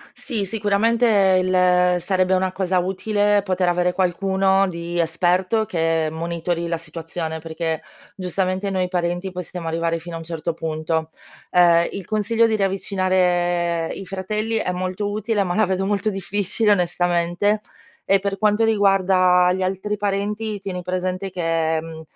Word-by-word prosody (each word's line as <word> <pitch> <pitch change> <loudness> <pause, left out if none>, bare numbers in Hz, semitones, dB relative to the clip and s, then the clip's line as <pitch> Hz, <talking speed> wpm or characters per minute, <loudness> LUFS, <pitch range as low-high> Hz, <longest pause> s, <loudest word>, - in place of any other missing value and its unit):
Sì, 215 -4 -3
sicuramente 210 -1 +3
il 180 -1 +3
sarebbe 185 +1 +1
una 185 0 0
cosa 185 -1 0
utile 205 +2 +1
poter 185 -2 0
avere 180 0 +1
qualcuno 190 +1 +2
di 170 0 -5
esperto 180 +6 +1
che 165 -4 0
monitori 170 +1 -3
la 170 - -1
situazione. 160 0 -6
Perché 160 0 -3 0.3
giustamente 185 +1 -2
noi 185 -1 0
parenti 175 +1 -2
possiamo 175 -1 -6
arrivare 165 0 -1
fino 170 +1 -9
a - - -4
un 165 - -9
certo 165 0 -4
punto. 160 0 -2 0.4
Ehm, 170 -1 +5
il 195 -2 -6
consiglio 225 +2 +1
di 220 -1 +1
riavvicinare 180 -3 +1
i 195 - -8
fratelli 215 +4 -2
è 180 -4 -1
molto 185 +3 -3
utile, 215 0 0
ma 180 -2 -2
la 215 -2 +3
vedo 190 +1 -1
molto 205 +1 0
difficile 205 +2 0
onestamente. 175 +2 +1 0.5
E 195 -1 +5
per 195 0 -3
quanto 210 +2 +2
riguarda 190 -4 +4
gli 185 +1 -2
altri 195 +3 -2
parenti, 205 +1 -2
tieni 190 -2 -4
presente 185 +1 -2
che, 165 -2 0
mhmm, 160 -1 -9
185 Hz, 145 wpm, -21 LUFS, 170-200 Hz, 0.5 s, Ehm